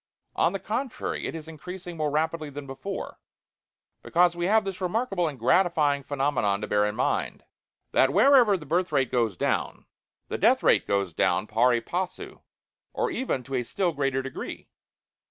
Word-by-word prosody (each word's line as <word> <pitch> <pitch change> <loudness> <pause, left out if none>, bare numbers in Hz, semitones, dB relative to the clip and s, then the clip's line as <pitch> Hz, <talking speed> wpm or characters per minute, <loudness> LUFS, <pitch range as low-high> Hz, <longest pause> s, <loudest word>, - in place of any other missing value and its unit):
On 165 - +2
the 195 - -2
contrary, 235 +7 -3
it - - -5
is 160 -1 -8
increasing 175 +3 -8
more 155 -2 -1
rapidly 155 +1 -1
than 145 0 -8
before, 135 +9 -6 0.8
because 175 0 +2
we 175 0 -1
have 215 +1 +3
this 195 -1 -5
remarkable 185 -2 0
and 145 -3 -5
gratifying 150 +2 +2
phenomenon 135 -8 0
to - - -2
bear 105 0 +2
in 105 - -3
mind, - - -1 0.5
that 130 - +4
WHEREVER 245 - +5
THE 155 - -11
BIRTH 175 +5 0
RATE 130 -3 +1
GOES 115 -7 0
DOWN, - - -1 0.4
THE - - -4
DEATH - - +4
RATE - - +3
GOES 100 -4 0
DOWN 90 +5 +1
PARI 120 +2 +2
PASSU, 185 +5 -5 0.5
OR - - -1
EVEN 240 - -2
TO 135 - -9
A 130 - +1
STILL 175 +9 -1
GREATER 135 -2 -1
DEGREE. 135 0 -7
155 Hz, 170 wpm, -26 LUFS, 130-185 Hz, 0.8 s, WHEREVER